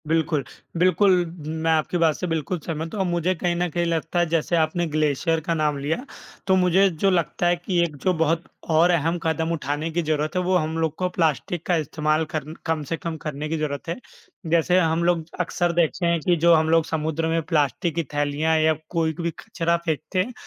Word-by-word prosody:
बिल्कुल, 160 Hz, -2 st, +1 dB, 0.3 s
बिल्कुल 185 Hz, +3 st, +4 dB, 0.4 s
मैं 160 Hz, +1 st, -1 dB
आपकी 160 Hz, +2 st, +1 dB
बात 165 Hz, -3 st, +3 dB
से 180 Hz, -, -4 dB
बिल्कुल 165 Hz, +2 st, -2 dB
सहमत 160 Hz, +1 st, -5 dB
हूँ 210 Hz, -, -1 dB
औ -, -, +3 dB
मुझे 175 Hz, +1 st, 0 dB
कहीं 175 Hz, +1 st, -1 dB
न 175 Hz, +1 st, 0 dB
कहीं 170 Hz, +2 st, -1 dB
लगता 165 Hz, +1 st, -1 dB
है 175 Hz, -, +3 dB
जैसे 165 Hz, +1 st, +1 dB
आपने 165 Hz, +2 st, +1 dB
ग्लेशियर 155 Hz, +1 st, +1 dB
का 165 Hz, +2 st, -2 dB
नाम 150 Hz, -2 st, 0 dB
लिया, 155 Hz, -, -2 dB, 0.4 s
तो 190 Hz, -, +4 dB
मुझे 185 Hz, +1 st, +4 dB
जो 180 Hz, +3 st, +1 dB
लगता 175 Hz, -1 st, +1 dB
है 175 Hz, -, +3 dB
कि 175 Hz, +1 st, -2 dB
एक 160 Hz, -3 st, -3 dB
जो 185 Hz, -, +3 dB
बहुत 165 Hz, +1 st, +1 dB, 0.3 s
और 165 Hz, +3 st, +5 dB
अहम 165 Hz, +1 st, +1 dB
कदम 160 Hz, 0 st, 0 dB
उठाने 150 Hz, 0 st, -2 dB
की 175 Hz, +2 st, 0 dB
ज़रूरत 155 Hz, +1 st, -1 dB
है, 180 Hz, -, +2 dB
वो 185 Hz, +1 st, +1 dB
हम 160 Hz, -1 st, -2 dB
लोग 160 Hz, -1 st, -1 dB
को 185 Hz, -, 0 dB
प्लास्टिक 165 Hz, 0 st, -1 dB
का 180 Hz, -, +2 dB
इस्तेमाल 155 Hz, 0 st, 0 dB
कर 155 Hz, -2 st, -1 dB
न 155 Hz, -, -7 dB
कम 160 Hz, -2 st, -1 dB
से 165 Hz, +3 st, -3 dB
कम 165 Hz, 0 st, -4 dB
करने 150 Hz, 0 st, -5 dB
की 165 Hz, -, -1 dB
ज़रूरत 145 Hz, -1 st, -3 dB
है। 170 Hz, -, -1 dB, 0.6 s
जैसे 170 Hz, +2 st, +3 dB
हम 165 Hz, -1 st, +1 dB
लोग 170 Hz, -1 st, +2 dB, 0.2 s
अक्सर 175 Hz, 0 st, 0 dB
देखते 170 Hz, +1 st, +1 dB
हैं 170 Hz, 0 st, +2 dB
कि 175 Hz, +3 st, +2 dB
जो 170 Hz, +1 st, +5 dB
हम 160 Hz, -1 st, +3 dB
लोग 165 Hz, 0 st, +4 dB
समुद्र 160 Hz, 0 st, -1 dB
में 165 Hz, 0 st, +1 dB
प्लास्टिक 155 Hz, 0 st, 0 dB
की 170 Hz, -, 0 dB
थैलियाँ 145 Hz, +2 st, +1 dB
या 155 Hz, 0 st, +4 dB, 0.2 s
कोई 165 Hz, -2 st, 0 dB
कभी 170 Hz, +2 st, -3 dB
कचरा 170 Hz, -6 st, -1 dB
फेंकते 160 Hz, +3 st, -2 dB
हैं, 220 Hz, +7 st, -1 dB
165 Hz, 220 wpm, -23 LUFS, 155-175 Hz, 0.6 s, और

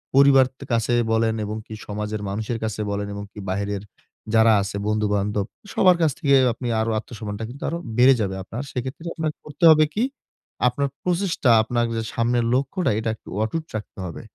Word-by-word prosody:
পরিবার 135 Hz, -1 st, +7 dB
তে -, -, -10 dB
কাছে 115 Hz, +1 st, +1 dB, 0.2 s
বলেন 110 Hz, 0 st, +2 dB
এবং 105 Hz, +1 st, -4 dB
কি 110 Hz, -, -9 dB
সমাজের 105 Hz, 0 st, -3 dB
মানুষের 110 Hz, +4 st, -3 dB
কাছে 110 Hz, -1 st, -2 dB
বলেন 100 Hz, 0 st, -2 dB
এবং 100 Hz, 0 st, -5 dB
কি -, -, -11 dB
বাহিরের 100 Hz, +1 st, -2 dB, 0.5 s
যারা 110 Hz, 0 st, +6 dB
আছে 100 Hz, +1 st, -4 dB
বন্ধু 105 Hz, 0 st, +1 dB
বান্ধব, 100 Hz, 0 st, 0 dB, 0.3 s
সবার 180 Hz, -2 st, +5 dB
কাছ 160 Hz, -3 st, +4 dB
থেকে 140 Hz, -4 st, +4 dB, 0.2 s
আপনি 120 Hz, +2 st, -6 dB
আরো 110 Hz, +1 st, 0 dB
আত্মসম্মানটা 110 Hz, -2 st, -7 dB
কিন্তু 135 Hz, +4 st, -9 dB
আরো 170 Hz, -, -2 dB, 0.2 s
বেড়ে 130 Hz, +2 st, +7 dB
যাবে 95 Hz, -2 st, -1 dB
আপনার। 115 Hz, +7 st, -6 dB
সেক্ষেত্রে 130 Hz, +6 st, -5 dB
আপনাকে 155 Hz, -2 st, -2 dB
করতে 150 Hz, +4 st, -9 dB
হবে 155 Hz, 0 st, +6 dB
কি? 220 Hz, -, +1 dB, 0.6 s
আপনার 140 Hz, +3 st, 0 dB, 0.2 s
প্রচেষ্টা, 180 Hz, -7 st, +1 dB
আপনার 120 Hz, +2 st, 0 dB
যে -, -, 0 dB
সামনের 120 Hz, 0 st, +1 dB
লক্ষ্যটা, 140 Hz, +8 st, +1 dB
এটা 115 Hz, -, -2 dB
একটু -, -, -15 dB
অটুট 160 Hz, +9 st, -2 dB
রাখতে 105 Hz, -1 st, -6 dB
হবে। 85 Hz, -, -7 dB
115 Hz, 185 wpm, -23 LUFS, 105-140 Hz, 0.6 s, পরিবার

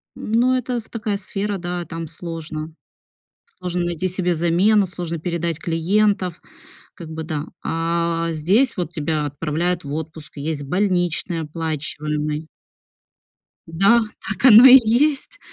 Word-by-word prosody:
Ну, 240 Hz, +4 st, +1 dB
это 250 Hz, -1 st, -2 dB
в 220 Hz, -, -22 dB
такая 215 Hz, -3 st, -2 dB
сфера, 200 Hz, +1 st, -3 dB
да, 175 Hz, -1 st, -4 dB
там 165 Hz, -1 st, -6 dB
сложно, 160 Hz, -1 st, -7 dB, 0.7 s
сложно 180 Hz, -, -4 dB
найти 175 Hz, +1 st, -1 dB
себе 180 Hz, -1 st, 0 dB
замену, 180 Hz, +5 st, +3 dB
сложно 170 Hz, -2 st, -5 dB
передать 170 Hz, -1 st, -2 dB
клиентов, 180 Hz, +2 st, 0 dB, 0.5 s
как 170 Hz, -4 st, -9 dB
бы, 160 Hz, 0 st, -5 dB
да. 155 Hz, -2 st, -4 dB, 0.2 s
А, 165 Hz, 0 st, -1 dB
здесь 190 Hz, -, +2 dB
вот 175 Hz, -3 st, -2 dB
тебя 155 Hz, -1 st, -1 dB
отправляют 160 Hz, +5 st, -2 dB
в 140 Hz, 0 st, -6 dB
отпуск, 160 Hz, -1 st, -7 dB
есть 145 Hz, 0 st, -3 dB
больничный 175 Hz, 0 st, 0 dB
оплачиваемый. 150 Hz, -1 st, -3 dB, 1.2 s
Да, 195 Hz, +8 st, +4 dB, 0.3 s
так -, -, -1 dB
оно 235 Hz, 0 st, +10 dB
и 265 Hz, +1 st, +11 dB
есть, 280 Hz, -, +1 dB
170 Hz, 130 wpm, -21 LUFS, 160-200 Hz, 1.2 s, и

